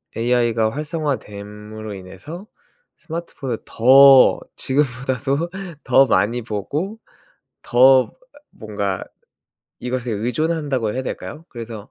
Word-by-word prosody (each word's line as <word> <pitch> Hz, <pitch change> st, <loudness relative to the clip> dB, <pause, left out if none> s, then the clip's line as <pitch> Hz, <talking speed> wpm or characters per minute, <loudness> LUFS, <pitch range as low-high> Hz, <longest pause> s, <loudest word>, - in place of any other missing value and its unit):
AI가 115 Hz, -2 st, +1 dB
활성화됨으로 110 Hz, -, -5 dB
인해서 100 Hz, -, -10 dB, 0.5 s
스마트폰을 160 Hz, -7 st, -5 dB
더 135 Hz, +3 st, +7 dB, 0.2 s
지금 140 Hz, +3 st, +1 dB, 0.2 s
보다도 140 Hz, +6 st, -1 dB, 0.3 s
더 135 Hz, +1 st, +5 dB
많이 110 Hz, +5 st, +1 dB
보고 140 Hz, -, -4 dB, 0.7 s
더 130 Hz, +1 st, +5 dB, 0.4 s
뭔가 100 Hz, -3 st, -4 dB, 0.8 s
이것에 125 Hz, -1 st, -3 dB
의존한다고 130 Hz, +1 st, -1 dB
해야 130 Hz, -, -2 dB
될까요? 150 Hz, +4 st, -7 dB
그래서 115 Hz, -3 st, -8 dB
125 Hz, 235 characters per minute, -21 LUFS, 110-140 Hz, 0.8 s, 더